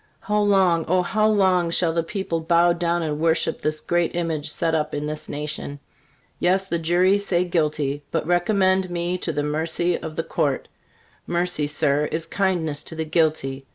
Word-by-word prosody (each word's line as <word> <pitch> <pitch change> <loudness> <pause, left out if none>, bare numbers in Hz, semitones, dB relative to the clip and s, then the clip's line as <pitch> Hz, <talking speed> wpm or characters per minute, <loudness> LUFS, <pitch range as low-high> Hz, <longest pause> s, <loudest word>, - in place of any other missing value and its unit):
How 210 0 0
long, 190 -5 +3
O, 180 +1 +2
how 215 +4 +1
long 190 -5 +3
shall 165 -1 +1
the 165 - +1
people 170 -1 -3
bow 170 +1 +3
down 170 0 -1
and 150 -2 -2
worship 165 0 +1
this 155 0 -1
great 175 -1 0
image 160 -3 -2
set 165 +2 -1
up 155 -1 -1
in 145 0 -3
this 150 0 -6
nation? 145 -1 -5 0.6
Yes, 190 +2 +2
the 170 -3 -2
jury 180 +4 +3
say 180 -3 +1
guilty, 150 -4 -1
but 165 - -2
recommend 185 +1 +2
me 175 +1 -2
to 170 - -2
the 145 -1 -2
mercy 160 +3 0
of 160 -1 -6
the 165 - -2
Court. 140 -4 -1 0.6
Mercy, 175 -4 0
Sir, 150 0 +1
is 160 +2 -3
kindness 175 -7 -1
to 160 - -8
the 160 0 -3
guilty. 150 -4 0
170 Hz, 180 wpm, -23 LUFS, 155-180 Hz, 0.6 s, long